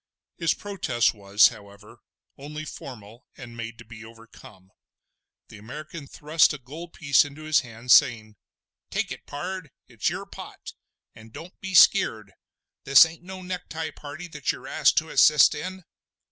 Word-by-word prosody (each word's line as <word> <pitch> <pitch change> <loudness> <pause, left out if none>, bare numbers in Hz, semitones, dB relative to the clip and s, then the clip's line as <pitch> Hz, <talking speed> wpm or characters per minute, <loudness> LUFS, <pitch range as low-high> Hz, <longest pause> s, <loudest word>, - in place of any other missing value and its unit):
His 165 -2 +1
protest 185 - -1
was, 100 0 +4
however, 100 -2 -15 0.4
only 150 +2 -8
formal 120 -5 -11
and 120 -3 -11
made 115 0 -7
to 120 - -13
be 115 0 -12
overcome. 110 -4 -16 0.8
The 105 - -12
American 150 +6 -9
thrust 155 +3 +2
a - - -6
gold 155 +7 -11
piece 140 -5 +3
into 145 +1 -10
his 155 -1 +3
hand, 120 -1 -6
saying: 115 -7 +4 0.5
"Take - - -2
it, - - -9
pard! 180 +2 -6 0.2
it's - - -2
your - - -5
pot; - - -11 0.4
and 110 0 -15
don't 170 +9 -12
be 190 0 -5
skeer'd. 110 - +4 0.5
This 135 +3 +8
ain't 165 +1 -10
no 185 +1 -9
necktie 175 -3 -5
party 150 +4 -9
that 150 -3 -2
you're 130 - -10
asked 155 -2 +2
to 160 0 +1
assist 150 +1 +5
in!" 185 +4 -7
140 Hz, 155 wpm, -25 LUFS, 115-160 Hz, 0.8 s, This